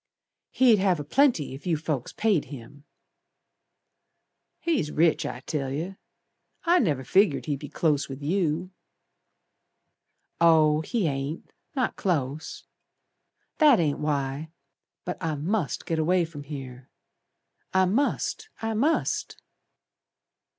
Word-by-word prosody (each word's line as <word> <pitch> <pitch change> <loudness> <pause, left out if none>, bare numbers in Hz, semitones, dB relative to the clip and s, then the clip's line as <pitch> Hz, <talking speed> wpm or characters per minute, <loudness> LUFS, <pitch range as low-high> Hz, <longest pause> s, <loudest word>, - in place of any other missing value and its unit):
"He'd 240 -5 +4
have 190 -4 +2
a - - -3
plenty, 235 - +2
if 135 +6 -9
you 165 -3 +2
folks 150 -5 -3
paid 210 -8 +1
him." 140 +2 -11 1.7
"He's 315 - 0
rich 160 +1 +2
I 125 - -6
tell 140 -1 -3
yer. 170 +7 -4 0.6
I 350 +1 +4
never 145 - 0
figured 190 -1 +3
he'd 145 -3 -2
be 145 - -8
close 150 -2 0
with 135 0 -6
you." 175 +1 0 1.7
"Oh, 155 -2 +5
he 220 +4 -1
ain't. 140 +2 -4 0.2
Not 255 -4 -1
close. 155 -4 -2 0.9
That 295 -7 +6
ain't 150 -4 0
why. 145 0 -2 0.6
But 180 - -5
I 160 -2 -1
must 165 +3 -2
git 165 -1 -1
away 175 +2 +2
from 145 -3 -10
here. 135 -3 -8 0.8
I 190 0 +4
must! 285 - 0
I 225 0 -2
must!" 285 +9 0
160 Hz, 120 wpm, -26 LUFS, 145-195 Hz, 1.7 s, That